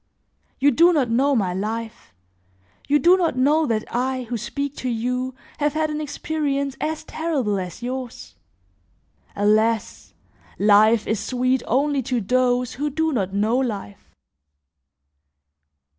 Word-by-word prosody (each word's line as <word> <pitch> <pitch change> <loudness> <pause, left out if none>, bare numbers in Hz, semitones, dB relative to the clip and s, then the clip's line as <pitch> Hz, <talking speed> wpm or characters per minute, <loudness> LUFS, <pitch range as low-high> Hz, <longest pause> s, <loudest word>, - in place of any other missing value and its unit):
You 285 +2 +4
do 340 +7 +5
not 265 -7 +1
know 275 +4 +2
my 190 -6 0
life; 220 +4 -5 0.8
you 290 - +4
do 345 +6 +5
not 335 -8 0
know 295 +4 +3
that 220 -2 0
I, 255 +1 -1
who 245 0 -5
speak 280 +6 -4
to 255 - -3
you, 250 +2 -2 0.2
have 295 -1 +1
had 310 0 0
an 300 0 -3
experience 285 -2 -2
as 310 0 -2
terrible 275 -11 -2
as 180 +5 -7
yours. 255 0 -6 1.0
Alas! 215 +2 0 0.4
life 215 +2 +4
is 215 -1 -1
sweet 255 +3 0
only 280 +3 +1
to 250 -1 -1
those 250 +3 +1
who 295 +3 -2
do 320 +3 0
not 195 -8 -1
know 215 +4 +1
life. 210 - -5
255 Hz, 135 wpm, -22 LUFS, 225-285 Hz, 1.0 s, do